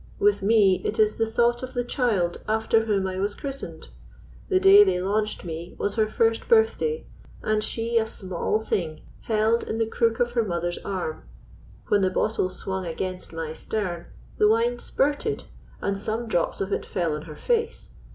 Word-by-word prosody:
With 415 0 +3
me 195 -3 +4
it 220 - -2
is 215 -1 +3
the 225 - +2
thought 240 +1 +2
of 255 0 -7
the 245 - +1
child 225 -9 0
after 220 +1 +2
whom 200 -3 +1
I 185 0 -3
was 205 +1 -1
christened. 275 -1 -7 0.6
The 375 -2 +4
day 390 +2 +9
they 280 - +1
launched 210 +2 -1
me 170 +1 -6
was 200 - -1
her 220 -1 +2
first 225 +1 +1
birthday, 460 0 +3 0.4
and 215 0 +1
she 230 +1 0
a 220 - -1
small 190 0 -2
thing 165 -8 -2 0.2
held 220 +1 +2
in 220 - -3
the 225 - +2
crook 225 0 0
of 240 0 +1
her 235 -1 +1
mother's 175 -3 -2
arm: 185 - -4 0.6
when 205 - +4
the 190 - +3
bottle 200 0 0
swung 190 +1 -4
against 185 +2 -4
my 165 -1 -4
stem 180 -1 -4 0.3
the 210 - +6
wine 235 +3 +2
spurted, 295 +10 -1 0.4
and 200 0 -1
some 220 +3 -2
drops 175 -6 0
of 195 +1 -1
it - - -1
fell 170 -4 -1
on 150 - -5
her 150 - -8
face. 465 - -1
215 Hz, 180 wpm, -25 LUFS, 185-235 Hz, 0.6 s, day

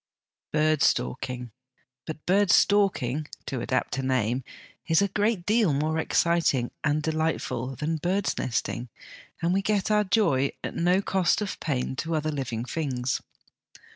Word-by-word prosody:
Bird 155 -1 +2
stalking. 125 -1 0 0.6
But 155 -1 -7
bird 200 +2 +3
'stalking,' 155 -9 +3 0.2
ta 130 - -3
adapt 130 +2 -1
a - - 0
name, 130 -1 0 0.4
is 160 -1 +4
a 200 - +3
great 205 -3 0
deal 215 -7 +3
more 155 +3 0
exciting 160 -7 +2
and 150 0 +1
delightful 155 -5 -1
than 155 +5 -2
bird's 185 +5 0
nesting, 120 0 -2 0.5
and 170 +2 +2
we 195 - +2
get 205 0 0
our 210 0 +4
joy 185 - +2
at - - -4
no 180 +3 +2
cost 190 -3 +2
of 210 -2 -4
pain 130 -4 -2
to 165 +3 -2
other 155 0 -1
living 125 -5 -3
things. 130 -4 -2
155 Hz, 145 wpm, -26 LUFS, 130-185 Hz, 0.6 s, is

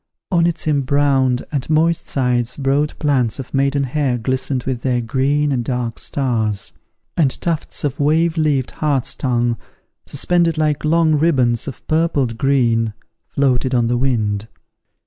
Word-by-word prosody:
On 170 -2 +3
its 170 -1 -3
embrowned 140 -3 +2
and 140 -2 -3
moist 165 +2 +2
sides 125 -2 0
broad 140 +2 0
plants 130 -6 +1
of 135 - -8
maiden 140 +1 +1
hair 135 -1 0
glistened 130 +2 -2
with 130 -3 -3
their 125 -2 0
green 140 +5 0
and 125 -3 0
dark 120 -2 -3
stars; 110 -7 -1 0.4
and 145 -6 +2
tufts 165 -3 -2
of 145 -2 -2
wave 160 +3 +2
leaved 150 -5 +1
hart's 145 -5 -1
tongue, 120 -3 0 0.5
suspended 170 +2 +1
like 150 -2 0
long 160 0 +3
ribands 135 -7 +2
of 140 - -8
purpled 150 -8 0
green, 115 -5 +2 0.4
floated 130 -2 +1
on 120 -1 +2
the 120 +1 +1
wind. 110 -5 0
135 Hz, 145 wpm, -19 LUFS, 125-150 Hz, 0.5 s, On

